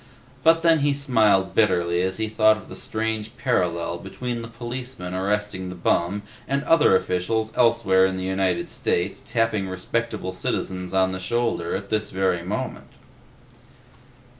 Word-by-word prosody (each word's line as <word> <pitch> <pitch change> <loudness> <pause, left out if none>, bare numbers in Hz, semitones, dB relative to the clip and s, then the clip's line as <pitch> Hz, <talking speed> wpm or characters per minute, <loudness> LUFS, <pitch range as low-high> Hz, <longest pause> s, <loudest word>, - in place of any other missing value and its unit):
But 165 +2 +4
then 165 -2 +5
he 145 0 +2
smiled 110 -9 +2
bitterly 85 -5 +2
as 95 +1 -1
he 110 0 -1
thought 110 0 +4
of - - -13
the - - -8
strange 110 +1 -3
parallel 85 -8 0
between 120 +6 -5
the 115 - -7
policemen 120 -4 -6
arresting 95 0 -1
the 90 - -7
bum 90 +3 0 0.2
and 140 +1 0
other 150 -11 +5
officials, 110 +5 0
elsewhere 115 -6 +4
in 95 0 -3
the 95 - -4
United 95 -1 -1
States, 90 +3 -1
tapping 115 -5 0
respectable 100 +1 -3
citizens 90 0 -3
on 95 0 +3
the 95 - -4
shoulder 115 -3 -1
at 100 +1 -6
this 110 -1 0
very 95 -2 0
moment. 95 +5 -4
105 Hz, 150 wpm, -24 LUFS, 95-115 Hz, 0.2 s, then